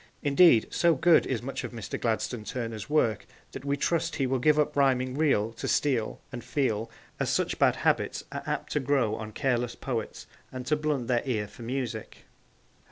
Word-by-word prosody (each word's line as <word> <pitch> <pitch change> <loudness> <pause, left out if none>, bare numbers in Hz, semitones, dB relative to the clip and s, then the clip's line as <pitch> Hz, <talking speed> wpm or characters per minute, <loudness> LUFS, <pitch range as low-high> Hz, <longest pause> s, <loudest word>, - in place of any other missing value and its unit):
Indeed, 145 -4 +6
so 170 -2 +3
good 165 +4 +4
is 120 -3 -2
much 135 +2 -4
of - - -6
Mr. 115 -3 -5
Gladstone 115 0 -1
Turner's 115 0 -5
work 115 -8 +1 0.2
that 135 - -8
we 140 0 -1
trust 165 +3 0
he 135 - 0
will 130 0 0
give 150 +4 +4
up 150 - +1
rhyming 130 -2 +2
'real' 135 -8 +2
to 115 - -5
'steal' 125 -7 0
and 125 -2 -7
'feel,' 115 -6 -1 0.3
as - - 0
such - - 0
bad - - +4
habits - - 0
are - - -4
apt - - -3
to - - +1
grow 135 -5 +1
on 110 0 -5
careless 120 -1 -1
poets 120 -5 -4 0.3
and 130 -1 -6
to 150 - +2
blunt 150 -4 -1
their 120 -1 +1
ear 110 -6 -1
for 100 - -15
music. 120 -2 -5
130 Hz, 190 wpm, -28 LUFS, 115-145 Hz, 0.3 s, Indeed